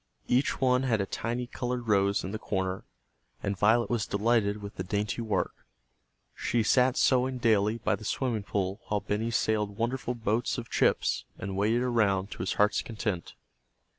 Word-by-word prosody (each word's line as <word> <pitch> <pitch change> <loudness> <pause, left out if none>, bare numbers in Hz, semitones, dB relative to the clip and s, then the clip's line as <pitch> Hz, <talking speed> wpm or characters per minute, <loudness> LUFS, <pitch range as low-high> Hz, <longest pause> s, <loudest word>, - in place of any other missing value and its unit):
Each 130 +3 +1
one 125 -1 +3
had 120 -5 +1
a 100 - 0
tiny 120 +5 -3
colored 125 0 -4
rose 100 -1 +2
in 95 - -4
the 110 - -4
corner, 95 -3 -2 0.6
and 100 - -1
Violet 110 +4 +3
was 115 -4 -1
delighted 105 0 +1
with 100 0 -8
the 95 - -3
dainty 105 +4 -2
work. 110 -2 -1 0.8
She 115 -1 0
sat 125 +3 +3
sewing 130 0 +3
daily 110 -2 +2
by 115 - 0
the - - -12
swimming 115 0 -1
pool 100 -1 -2
while 105 -1 0
Benny 105 +3 -1
sailed 105 -3 0
wonderful 125 +1 -1
boats 115 +1 0
of 115 -2 -7
chips, - - +2
and 95 0 -5
waded 110 +5 +2
around 105 -5 +1
to - - -8
his 90 - -1
heart's 105 0 +2
content. 105 -6 -4
110 Hz, 170 wpm, -29 LUFS, 100-120 Hz, 0.8 s, one